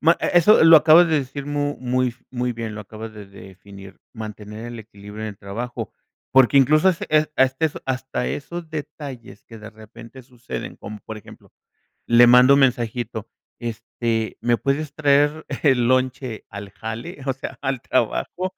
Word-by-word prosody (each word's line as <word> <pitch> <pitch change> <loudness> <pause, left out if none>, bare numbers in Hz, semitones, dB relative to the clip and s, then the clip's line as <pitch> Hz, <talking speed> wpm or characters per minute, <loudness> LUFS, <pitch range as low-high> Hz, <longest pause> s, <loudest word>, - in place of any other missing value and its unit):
ma 165 +2 +4
e - - 0
eso 175 +1 +6
lo 165 0 +9
acabas 160 +3 +6
de 155 -2 +2
decir 135 +1 -7
mu, 145 0 -2
muy 125 -1 0 0.2
muy 125 -1 -2
bien, 115 -2 -6
lo 105 - -7
acabas 110 +2 -9
de 105 -1 -10
definir, 95 0 -14
mantener 110 0 -8
el 120 0 -8
equilibrio 105 0 -11
en 110 - -3
el 100 - -14
trabajo, 115 +5 -6 0.4
porque, 130 +1 +5
incluso, 155 +6 +4
ese 170 - -5 0.3
a - - +5
este 135 +5 0
son - - -10
hasta 130 -1 -3
esos 170 +3 -5
detalles 145 -7 -8
que 115 - -13
de 105 0 -10
repente 115 +4 -14
suceden, 125 0 -8
como 105 +1 -9
por 110 - -8
ejemplo, 105 - -15 0.6
le 120 +1 +7
mando 125 +3 +7
un 140 - +3
mensajito, 120 -3 -1 0.3
este: 115 -1 -3
"¿Me 120 0 +2
puedes 140 +3 -2
traer 145 +1 +2 0.2
el 130 -5 +3
lonche 130 -2 -1
al 100 0 -9
jale, 115 - -7
o 135 - +1
sea, 135 - -8
al 135 -3 -2
trabajo?", 185 - -1
125 Hz, 170 wpm, -22 LUFS, 110-140 Hz, 0.6 s, lo